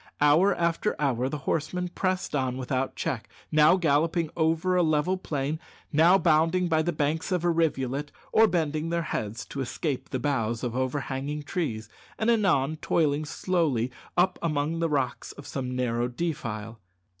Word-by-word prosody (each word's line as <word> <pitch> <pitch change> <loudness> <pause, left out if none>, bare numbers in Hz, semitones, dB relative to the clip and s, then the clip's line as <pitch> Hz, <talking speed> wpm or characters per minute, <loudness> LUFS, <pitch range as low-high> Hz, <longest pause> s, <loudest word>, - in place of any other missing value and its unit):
Hour 155 +7 +5
after 170 +4 0
hour 130 -3 +1
the 150 - -3
horsemen 175 +3 -1
pressed 185 -1 -2
on 130 -2 0
without 130 0 -2
check, - - -3 0.2
now 155 +3 +6
galloping 165 0 +1
over 165 +3 +1
a 180 - +4
level 155 +2 +2
plain, 150 -4 -3 0.3
now 165 +5 +6
bounding 165 +1 +3
by 160 -2 +2
the 175 +2 0
banks 150 +3 -1
of 180 -2 0
a 175 - +4
rivulet, 145 -4 0 0.2
or 225 0 +6
bending 160 -3 -1
their 170 0 0
heads 110 -6 -4
to 140 - -5
escape 135 +1 -3
the 130 - -2
boughs 120 -4 -1
of 120 -1 -2
overhanging 135 +2 -2
trees, 145 - -3 0.3
and 225 +2 +2
anon 165 - +2
toiling 155 -2 +1
slowly 145 -6 0 0.3
up 180 +1 +3
among 155 0 -1
the 165 -1 +1
rocks 140 -4 -2
of 140 - -12
some 130 -2 -4
narrow 120 -1 0
defile. 115 -6 -4
150 Hz, 160 wpm, -27 LUFS, 135-170 Hz, 0.3 s, now